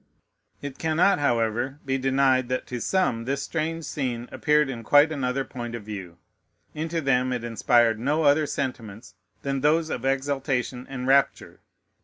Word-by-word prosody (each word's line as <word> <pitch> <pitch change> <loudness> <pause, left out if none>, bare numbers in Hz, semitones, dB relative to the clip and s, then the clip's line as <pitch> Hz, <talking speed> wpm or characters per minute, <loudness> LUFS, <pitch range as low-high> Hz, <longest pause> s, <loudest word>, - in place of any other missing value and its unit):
It 140 -2 -7
cannot, 160 +3 +2
however, 120 0 0
be 135 0 -1
denied 130 -1 +2
that 125 0 -2
to 125 -1 -5
some 150 -12 0
this 140 +2 -2
strange 165 0 -3
scene 125 -4 -3
appeared 150 -1 +2
in 120 -4 -6
quite 145 +6 +5
another 135 -2 -1
point 120 -2 -6
of 115 - -7
view. 95 -5 -8 0.6
Into 160 +2 -3
them 130 -2 +1
it 125 -2 -3
inspired 115 -1 +2
no 145 +6 0
other 145 +1 +4
sentiments 115 -6 -5 0.3
than 135 -1 -2
those 155 +2 +2
of 125 - -4
exultation 135 -2 -1
and 130 -2 -5
rapture. 135 +1 +1
135 Hz, 155 wpm, -25 LUFS, 120-145 Hz, 0.6 s, quite